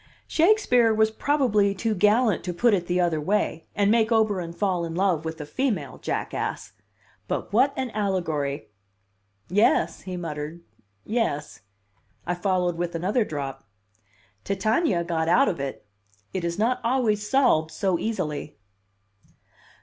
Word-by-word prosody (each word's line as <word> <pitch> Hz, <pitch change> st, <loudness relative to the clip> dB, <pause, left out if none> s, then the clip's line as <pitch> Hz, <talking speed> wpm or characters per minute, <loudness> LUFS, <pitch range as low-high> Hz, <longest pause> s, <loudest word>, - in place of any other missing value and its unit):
"Shakespeare 315 Hz, -, +4 dB
was 220 Hz, 0 st, +3 dB
probably 220 Hz, -7 st, +2 dB
too 220 Hz, +3 st, -1 dB
gallant 210 Hz, +1 st, +3 dB
to 180 Hz, -2 st, -3 dB
put 235 Hz, +4 st, +3 dB
it 175 Hz, -3 st, 0 dB
the 180 Hz, +1 st, +1 dB
other 170 Hz, -3 st, +1 dB
way, 180 Hz, -2 st, -1 dB
and 205 Hz, 0 st, +3 dB
make 225 Hz, -1 st, +3 dB
Oberon 205 Hz, -6 st, +1 dB
fall 180 Hz, -1 st, -1 dB
in 165 Hz, -1 st, -4 dB
love 180 Hz, -4 st, +1 dB
with 160 Hz, 0 st, -5 dB
a 150 Hz, -, -5 dB
female 190 Hz, -, -2 dB
jackass. -, -, -3 dB, 0.5 s
But -, -, -3 dB
what 265 Hz, +6 st, +4 dB
an 260 Hz, -3 st, -2 dB
allegory!" 160 Hz, -, -2 dB, 0.8 s
"Yes," 180 Hz, -3 st, +2 dB
he 185 Hz, -1 st, -6 dB
muttered. 160 Hz, 0 st, -5 dB, 0.4 s
"Yes." 220 Hz, -10 st, -2 dB, 0.6 s
I 175 Hz, -, 0 dB
followed 180 Hz, -1 st, 0 dB
with 175 Hz, -1 st, -2 dB
another 195 Hz, +8 st, +1 dB
drop. 140 Hz, -7 st, -5 dB, 0.8 s
"Titania 200 Hz, -, +1 dB
got 165 Hz, -1 st, -1 dB
out 255 Hz, +11 st, +5 dB
of 170 Hz, -, -1 dB
it. 135 Hz, -6 st, -5 dB, 0.5 s
It 185 Hz, -, -2 dB
is 170 Hz, 0 st, -2 dB
not 235 Hz, +4 st, +1 dB
always 225 Hz, -4 st, +1 dB
solved 250 Hz, -, +3 dB
so 175 Hz, +2 st, -1 dB
easily." 165 Hz, -9 st, -3 dB
190 Hz, 140 wpm, -25 LUFS, 165-220 Hz, 0.8 s, out